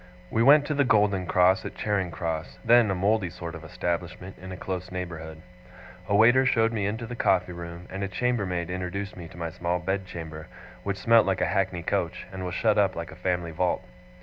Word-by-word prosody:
We 115 - +1
went 145 +4 +7
to 150 - -1
the 140 0 +3
Golden 105 -6 +2
Cross 95 +1 +4
at - - -7
Charing 100 -4 -1
Cross, 80 0 -4
then 120 -1 +6
a 95 - +1
mouldy 100 0 +1
sort 85 -1 -7
of - - -9
establishment 90 +2 -4
in 95 0 -8
a 90 - -6
close 90 0 -5
neighbourhood. 85 -3 -6 0.7
A 100 - +3
waiter 120 +5 +6
showed 115 -3 +2
me 100 -3 0
into 110 +3 -3
the 120 +2 -6
coffee 90 -5 +2
room; 85 0 -8
and 95 +1 -4
a - - -1
chambermaid 95 -6 -1
introduced 95 +3 -4
me 85 -2 -8
to 80 - -14
my 85 -1 -4
small 85 +2 -1
bedchamber, 85 -4 -4 0.3
which 100 -1 -3
smelt 115 +2 +5
like 95 - +1
a - - +3
hackney 95 -3 0
coach, 90 -3 -1
and 95 0 -5
was 90 -1 -4
shut 110 0 +3
up 100 -2 +2
like 85 +1 -5
a - - -10
family 90 -2 -1
vault. 90 +3 0
95 Hz, 210 wpm, -27 LUFS, 85-105 Hz, 0.7 s, went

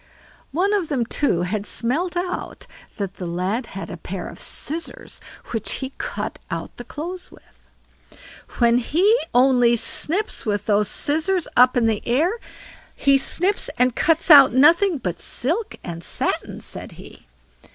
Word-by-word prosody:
One 370 +8 +1
of 385 -6 0
them, 260 -6 0
too, 225 -8 0
had 200 +3 -3
smelt 335 +10 -1
out 360 +1 -4 0.3
that 200 -3 -4
the 180 - -5
lad 185 +8 -2
had 195 - -6
a - - -6
pair 180 +2 -6
of - - -12
scissors 325 +3 -6 0.3
which 225 -2 -2
he 265 0 -4
cut - - -4
out - - -5
the 245 - -7
clothes 350 +8 -7
with. - - -21 0.9
"When 235 0 +4
he 360 - +3 0.2
only 245 -1 +4
snips 320 - -2
with 205 -1 -1
those 210 -1 +2
scissors 320 - 0
up 250 +1 +5
in 240 - +3
the 220 -2 +1
air 285 +10 +2 0.6
he 275 0 +3
snips 370 +8 0
and 250 -1 +2
cuts 325 +1 +2
out 280 -4 +9
nothing 330 +7 +5
but - - -4
silk 450 - -2
and 170 -1 -6
satin", - - -3
said - - -8
he. - - -14
260 Hz, 150 wpm, -22 LUFS, 225-335 Hz, 0.9 s, out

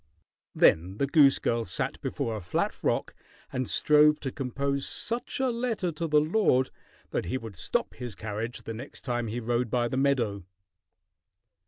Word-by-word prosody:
Then 90 +5 +4
the 140 - +2
goose 140 -1 +5
girl 115 0 0
sat 90 -4 -2
before 115 - -2
a 105 - -5
flat 90 - -1
rock - - 0 0.4
and 130 -1 -1
strove 150 0 +5
to 135 - -3
compose 140 +1 -2
such 235 +3 -3
a 260 -1 +2
letter 230 -7 -1
to 165 +2 -3
the 150 -1 +5
lord 155 -5 +2 0.4
that - - -1
he 90 - -1
would 115 -5 -8
stop - - -1
his 120 -5 -7
carriage 110 +4 -5
the 115 - -5
next 125 +6 -8
time 120 -2 -2
he 115 +3 -3
rode 120 +1 0
by 120 +1 +1
the 130 - -3
meadow. 120 -8 +1
130 Hz, 170 wpm, -28 LUFS, 115-150 Hz, 0.4 s, goose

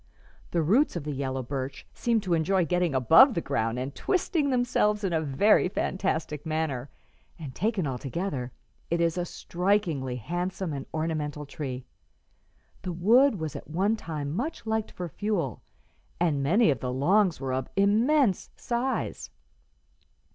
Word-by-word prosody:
The 170 -2 +1
roots 225 - +3
of 170 - -3
the 150 - -3
yellow 135 -1 -3
birch 135 +1 -5
seem 235 -3 +1
to 185 -4 -1
enjoy 170 +3 +2
getting 175 -2 0
above 165 - +7
the - - +1
ground 120 -6 -1
and 130 +2 -4
twisting 330 -6 0
themselves 245 -4 +1
in 190 -3 0
a 160 - +2
very 160 +7 +3
fantastic 165 -6 -2
manner, 155 -5 -2 0.5
and, 150 -6 -8
taken 205 - 0
altogether, 135 0 -3 0.4
it 170 - 0
is 170 -1 +2
a 175 -1 -1
strikingly 175 -9 -1
handsome 175 - -3
and 135 -1 -5
ornamental 155 -2 -2
tree. 135 -3 -6 1.0
The 180 -2 -4
wood 230 +9 +5
was 160 -5 -4
at - - -8
one 195 +7 +1
time 155 -7 -5
much 260 - -3
liked 220 -1 -1
for 180 - -6
fuel, 170 - -2 0.6
and 160 -5 +1
many 170 - +4
of 135 - -2
the 125 +1 -3
logs 180 +8 +2
were 135 -2 -3
of 130 0 -2
immense 215 - +3
size." 245 +1 -2
170 Hz, 150 wpm, -27 LUFS, 140-205 Hz, 1.0 s, above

